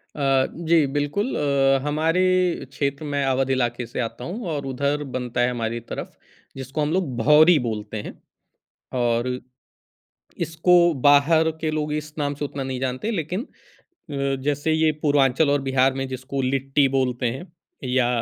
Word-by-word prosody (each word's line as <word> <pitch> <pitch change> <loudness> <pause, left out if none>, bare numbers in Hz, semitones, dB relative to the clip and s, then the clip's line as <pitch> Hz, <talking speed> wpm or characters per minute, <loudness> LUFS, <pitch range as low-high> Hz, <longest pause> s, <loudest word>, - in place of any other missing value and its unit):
अ, 135 -2 +2 0.2
जी, 165 -3 +5
बिल्कुल। 145 - -1
अ, 135 -2 +2
हमारे 160 +4 +1 0.5
क्षेत्र 140 +1 -2
मैं 145 -1 -1
अवध 135 0 +1
इलाके 120 -2 0
से 120 - -6
आता 120 +1 -4
हूँ 205 - -5
और 145 -3 -3
उधर 140 +2 -1
बनता 125 -1 -2
है 120 - +3
हमारी 115 -1 -3
तरफ, 115 - -8 0.4
जिसको 135 +3 -4
हम 150 +1 0
लोग 175 -9 -1
भौरी 155 +7 +6
बोलते 110 -3 -4
हैं। - - -8 0.9
और 120 0 +1 1.2
इसको 170 +2 +4
बाहर 155 +3 +5
के 155 - 0
लोग 150 -1 -2
इस 150 0 -4
नाम 145 -1 -1
से 145 - -3
उतना 140 -1 -5
नहीं 130 -1 -4
जानते, 130 - -2
लेकिन 185 - -3 0.6
अ, 140 -1 -1
जैसे 145 +2 0
ये 160 0 +3
पूर्वांचल 140 0 +3
और 145 -1 +2
बिहार 135 0 +2
में 135 0 -3
जिसको 130 +1 -4
लिट्टी 135 +2 +1
बोलते 125 -2 0
हैं 135 +6 -6 0.5
या 125 -1 +2
140 Hz, 160 wpm, -23 LUFS, 130-155 Hz, 1.2 s, भौरी